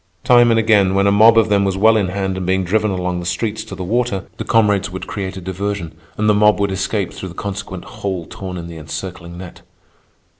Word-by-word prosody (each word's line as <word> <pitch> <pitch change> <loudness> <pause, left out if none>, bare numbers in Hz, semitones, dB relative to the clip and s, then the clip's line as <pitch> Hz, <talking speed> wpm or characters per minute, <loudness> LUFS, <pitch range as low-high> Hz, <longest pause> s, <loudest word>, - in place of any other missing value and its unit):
Time 120 -2 +5
and 115 -1 +3
again, 105 -4 +3
when 100 0 +3
a 100 - +4
mob 110 +3 +6
of 110 -1 +4
them 100 -1 +3
was 95 -1 -1
well 110 +3 +5
in 100 -3 +1
hand 95 0 -2
and 95 - -4
being 95 +1 +1
driven 105 +4 +1
along 90 -2 -2
the - - -6
streets 105 +4 -2
to 110 -3 -9
the 95 - -6
water, 105 -1 -1
the - - -4
comrades 105 -3 +2
would 95 0 -6
create 95 -2 -5
a - - -6
diversion, 95 -2 -4 0.2
and 105 - 0
the 105 - +5
mob 105 0 +4
would 100 -1 0
escape 95 0 -2
through 95 - -7
the 85 - -12
consequent 100 -2 -6
hole 95 -4 -5
torn 95 0 -7
in 85 - -6
the 85 -1 -9
encircling 85 +2 -7
net. 90 -1 -10
95 Hz, 235 wpm, -18 LUFS, 95-105 Hz, 0.2 s, mob